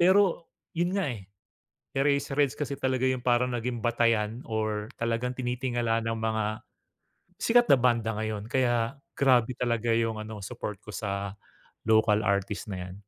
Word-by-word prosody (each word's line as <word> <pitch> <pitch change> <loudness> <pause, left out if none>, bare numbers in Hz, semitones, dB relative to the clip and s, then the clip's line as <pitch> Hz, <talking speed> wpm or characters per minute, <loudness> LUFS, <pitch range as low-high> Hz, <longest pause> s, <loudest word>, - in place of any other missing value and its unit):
pero 185 -1 +4 0.3
yun 175 +3 0
nga 180 -10 0
eh. 100 -4 -10 0.7
Eraserheads 140 0 +2
kasi 140 -2 -2
talaga 130 -1 0
yung 130 -1 -1
parang 125 0 +3
naging 120 0 -3
batayan 115 0 +1
or 110 -1 -2
talagang 115 +2 0
tinitingala 120 -2 -1
ng 115 - 0
mga, 110 -1 -1 0.8
sikat 240 +1 +4
na 135 - +7
banda 120 -2 +2
ngayon, 110 0 -3
kaya 120 0 +1 0.2
grabe 125 -3 +4
talaga 115 -1 +1
yung 115 -1 0
ano, 110 -1 -7
support 105 -2 -6
ko 105 - -10
sa 100 -2 -3 0.5
local 110 -1 +4
artist 100 +1 0
na 90 -1 -5
yan. 95 - -9
115 Hz, 145 wpm, -28 LUFS, 110-130 Hz, 0.8 s, na